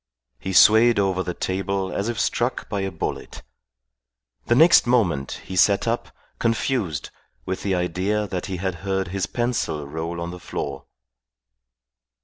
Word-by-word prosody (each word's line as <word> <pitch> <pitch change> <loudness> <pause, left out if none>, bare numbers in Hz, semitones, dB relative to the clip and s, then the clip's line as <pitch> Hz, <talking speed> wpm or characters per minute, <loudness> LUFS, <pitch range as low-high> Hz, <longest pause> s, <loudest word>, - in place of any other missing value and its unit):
He 95 - -4
swayed 110 +5 +6
over 95 -2 +1
the 90 -1 -4
table 95 0 -2
as 100 +3 -1
if 120 - -3
struck - - -1
by 100 - -2
a 95 - -1
bullet. 85 -4 -5 1.0
The 120 - +3
next 160 -1 +6
moment 90 - +1
he 95 - -6
sat 100 +4 +3
up, 115 +1 -1 0.3
confused, 115 - -1 0.3
with 95 0 -3
the 95 -2 0
idea 95 +4 -1
that 95 -2 -4
he 95 -2 -4
had 95 -1 -3
heard 95 -1 -1
his 95 0 -2
pencil 120 - -2
roll 80 +3 -4
on 85 0 -4
the 90 - -8
floor. - - -5
95 Hz, 150 wpm, -23 LUFS, 90-105 Hz, 1.0 s, swayed